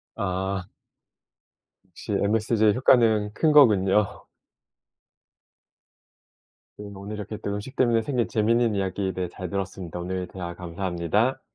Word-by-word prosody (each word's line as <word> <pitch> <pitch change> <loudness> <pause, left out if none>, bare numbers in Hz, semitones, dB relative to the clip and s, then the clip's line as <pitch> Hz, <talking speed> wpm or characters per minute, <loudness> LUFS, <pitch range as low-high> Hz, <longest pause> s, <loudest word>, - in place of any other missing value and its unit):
아. 95 -2 -3 1.2
역시 95 +4 -9
MSG의 110 +1 +2
효과는 110 -5 +3
큰 155 +5 +2
거군요. 105 -8 +4 2.5
네, 105 - -8
오늘 100 +2 -7
이렇게 105 +1 -6
또 100 - -4
음식 105 +7 -6
때문에 120 -3 +3
생긴 120 0 -1
재미있는 115 0 +2
이야기에 95 0 -1
대해 90 -1 -3
잘 90 -1 -7
들었습니다. 95 -3 -5
오늘 90 +1 -4
대화 85 -2 -7
감사합니다. 90 +7 -1
100 Hz, 275 characters per minute, -25 LUFS, 95-110 Hz, 2.5 s, 거군요